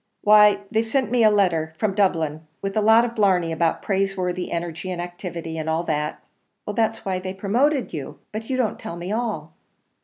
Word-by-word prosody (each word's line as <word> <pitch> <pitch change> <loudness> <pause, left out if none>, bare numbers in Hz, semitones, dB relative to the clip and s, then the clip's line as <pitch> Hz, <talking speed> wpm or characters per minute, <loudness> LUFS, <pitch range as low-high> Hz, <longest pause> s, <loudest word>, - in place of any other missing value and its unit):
"Why, 210 -1 +6
they've 220 0 +2
sent 245 +1 -1
me 245 -2 +3
a 215 - +7
letter 170 -6 +1
from 205 +2 0
Dublin, 160 -6 0
with 195 0 -4
a 215 - +2
lot 225 +2 +6
of 235 - -4
blarney 185 -6 +2
about 165 0 0
praiseworthy 190 -2 -1
energy 170 +2 -4
and 180 -1 -4
activity, 175 -2 -5
and 160 0 -3
all 160 +1 0
that 150 -2 -2 0.3
" - - -46
"That's 225 +1 0
why 190 -1 -1
they've 185 +1 -6
promoted 245 +4 +1
you: 145 -4 -6
but 220 +1 -6
you 260 - 0
don't 230 -4 0
tell 170 - -6
me 175 +3 -5
all." 215 -9 -3
195 Hz, 195 wpm, -23 LUFS, 170-215 Hz, 0.3 s, a